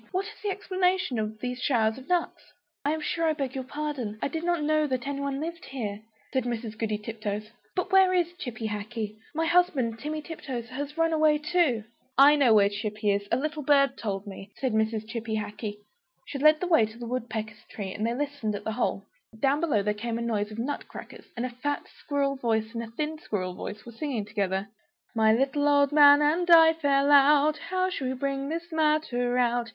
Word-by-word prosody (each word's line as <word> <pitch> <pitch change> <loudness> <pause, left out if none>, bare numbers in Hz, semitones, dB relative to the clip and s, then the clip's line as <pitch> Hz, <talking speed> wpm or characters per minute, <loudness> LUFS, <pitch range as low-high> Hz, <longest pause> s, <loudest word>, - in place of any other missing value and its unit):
What 380 +1 -1
is 430 0 -11
the 420 - -2
explanation 370 - 0
of 215 0 -3
these 250 0 -4
showers 225 -3 +1
of 265 - -15
nuts?" 355 -2 -1 0.3
"I 290 - +1
am 315 0 -2
sure 330 +2 0
I 315 - +3
beg 275 -4 -3
your 265 - -4
pardon; 270 -6 -4
I - - -1
did 320 +3 -4
not 345 -3 0
know 305 0 +2
that 255 -2 -2
anybody 280 0 -2
lived 335 +3 -5
here," 215 -6 -5 0.3
said 260 -2 +1
Mrs. 230 -2 -4
Goody 215 -1 -1
Tiptoes; 215 0 -5 0.2
"but 365 +1 -2
where 380 -1 +6
is 350 -1 +1
Chippy 230 -8 -4
Hackee? 215 0 -5 0.2
My 325 +1 +1
husband, 305 -10 +2
Timmy 305 +1 -4
Tiptoes, 255 -8 -6
has 285 +4 -6
run 330 0 +2
away 310 -1 +4
too." 300 -7 +1 0.3
"I 285 +2 +8
know 275 -5 +4
where 200 -1 +6
Chippy 210 +1 -2
is; 200 0 -1
a 230 - +3
little 305 +2 -3
bird 275 -2 +3
told 195 -2 -4
me," 195 0 -9
said 260 -4 -1
Mrs. 220 0 0
Chippy 225 -1 -4
Hackee. 210 0 -4 0.5
She 280 - -6
led 305 +2 +6
the 365 - -1
way 320 -11 +4
to 220 +1 -13
the 240 - -7
woodpecker's 225 -3 -4
tree, 195 -3 -5
and 210 - -4
they 230 +1 0
listened 285 -6 -2
at 205 - -6
the 220 - -2
hole. 235 +3 -1 0.3
Down 275 +3 +2
below 280 -12 +1
there 210 +1 +1
was 210 +1 -11
a 235 - -2
noise 215 -3 -1
of 215 - -8
nut 260 +5 -3
crackers, - - -11
and 240 - -1
a - - -3
fat 285 +4 -3
squirrel 280 -1 -1
voice 225 -2 -1
and 230 - -3
a 230 - -7
thin 305 +6 -4
squirrel 185 -8 -3
voice 210 +3 -7
were 240 - -9
singing 235 -3 -3
together 200 -2 -2 0.5
"My 220 -1 +4
little 270 +5 +2
old 285 -1 +4
man 290 0 +7
and 335 +4 +1
I 325 -1 +8
fell 285 -3 +2
out, 290 +2 +5
How 370 0 -1
shall 270 -7 -3
we 260 - -2
bring 275 +1 -2
this 335 +2 -4
matter 305 -6 +1
about? 240 -1 +1
260 Hz, 215 wpm, -27 LUFS, 220-305 Hz, 0.5 s, I